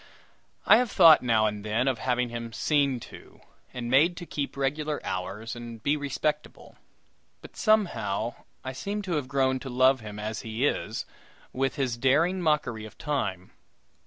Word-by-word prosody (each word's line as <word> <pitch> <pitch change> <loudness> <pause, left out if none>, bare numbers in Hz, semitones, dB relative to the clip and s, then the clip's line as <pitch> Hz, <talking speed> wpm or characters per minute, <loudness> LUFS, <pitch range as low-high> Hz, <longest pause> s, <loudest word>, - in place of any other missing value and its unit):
I - - +8
have 245 0 +1
thought 165 -6 +7
now 115 -3 +2
and 105 -1 -2
then 110 +5 0
of 130 -3 0
having 125 -1 0
him 115 0 -6
"seen 140 -1 +1
to," - - -13 0.3
and 125 -2 -5
made 155 +8 +3
to 175 - -7
keep 140 -4 -4
regular 150 +2 -1
hours 95 +6 -4
and 115 -2 -9
be 145 - +2
respectable; 150 +1 -3 0.6
but, - - -14
somehow, 120 - +1 0.3
I 130 - -5
seem 205 +9 -4
to 190 - -5
have 140 -4 -3
grown 130 -1 +1
to 135 - -7
love 130 +2 +4
him 105 -2 -9
as 110 +1 -4
he 110 +4 -2
is 110 -5 -2 0.5
with 135 0 -1
his 130 -4 -1
daring 160 +9 +2
mockery 150 -9 0
of 110 - -13
Time. 100 - -3
130 Hz, 165 wpm, -27 LUFS, 115-150 Hz, 0.6 s, I